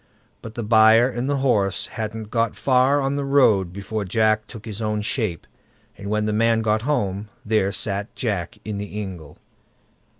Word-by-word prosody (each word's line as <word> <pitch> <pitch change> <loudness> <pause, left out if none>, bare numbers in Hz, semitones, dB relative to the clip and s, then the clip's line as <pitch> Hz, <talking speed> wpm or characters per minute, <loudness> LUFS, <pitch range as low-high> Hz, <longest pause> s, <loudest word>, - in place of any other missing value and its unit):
But 115 0 -9
the 120 - -3
buyer 110 +2 +6
and 125 +1 -3
the 145 - +1
horse 100 -7 +2
hadn't 110 -1 -6
got 115 -2 0
far 130 +2 +3
on 135 +1 -1
the 140 - -1
road 115 -10 +3
before 100 +3 -4
Jack 110 +2 +1
took 110 -2 -11
his 110 -1 -6
own 105 -1 -1
shape, 105 - -2 0.5
and 100 0 -7
when 105 0 0
the 105 - -1
man 115 +1 +2
got 110 0 +1
home, 105 -7 -1 0.2
there 105 -3 +1
sat 100 0 -2
Jack 100 -8 -3
in 105 -1 -4
the 105 +1 -5
ingle. 90 -7 -8
110 Hz, 175 wpm, -22 LUFS, 100-115 Hz, 0.5 s, buyer